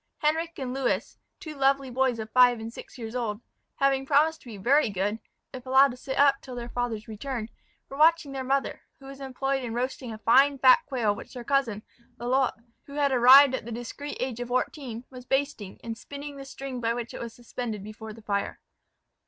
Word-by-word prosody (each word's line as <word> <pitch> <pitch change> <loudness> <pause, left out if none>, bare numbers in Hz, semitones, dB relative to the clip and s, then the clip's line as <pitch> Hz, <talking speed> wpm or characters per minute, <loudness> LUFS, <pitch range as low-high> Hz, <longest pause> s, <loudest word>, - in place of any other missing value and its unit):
Henric 325 +2 0
and 255 -2 -4
Lewis, 265 -2 -1 0.2
two 310 - -7
lovely 275 -1 +1
boys 255 -1 +1
of 220 -1 -6
five 245 -1 +5
and 225 +1 -7
six - - -11
years 225 -1 -7
old, 220 -4 -2 0.4
having 275 -1 +2
promised 305 +3 +3
to - - -17
be 220 -3 -8
very 255 +6 +3
good, 205 +3 -1 0.3
if 255 -1 -7
allowed 270 +2 +6
to - - -8
sit 265 +1 -5
up 280 -1 +4
till 255 - -9
their 240 0 -6
father's 235 -3 -3
return, 225 +1 -5 0.4
were 275 - -9
watching 315 -1 +4
their 265 -1 -4
mother, 270 +1 -1 0.2
who 270 - -16
was 275 0 -10
employed 270 0 -2
in 230 -2 -4
roasting 250 0 -3
a 220 - -6
fine 275 +6 +4
fat 260 -1 +7
quail 235 -6 +1
which 205 - -11
their 245 - -6
cousin, 235 -6 0 0.3
Lalotte, 245 -1 0 0.2
who 280 - -12
had 285 -1 +2
arrived 260 +2 +8
at 260 - -2
the 235 - -7
discreet 245 +5 -6
age 250 -2 -3
of 245 - -4
fourteen, 250 -1 -2
was 250 -1 -10
basting, 270 -6 -2
and 230 -1 -4
spinning 285 +4 -8
the 275 -1 -9
string 270 -2 -6
by 230 0 0
which 235 -1 -5
it - - -7
was 235 -1 -7
suspended 235 -3 -5
before 215 +1 -9
the 220 0 -13
fire. 200 -1 -2
255 Hz, 210 wpm, -27 LUFS, 230-275 Hz, 0.4 s, arrived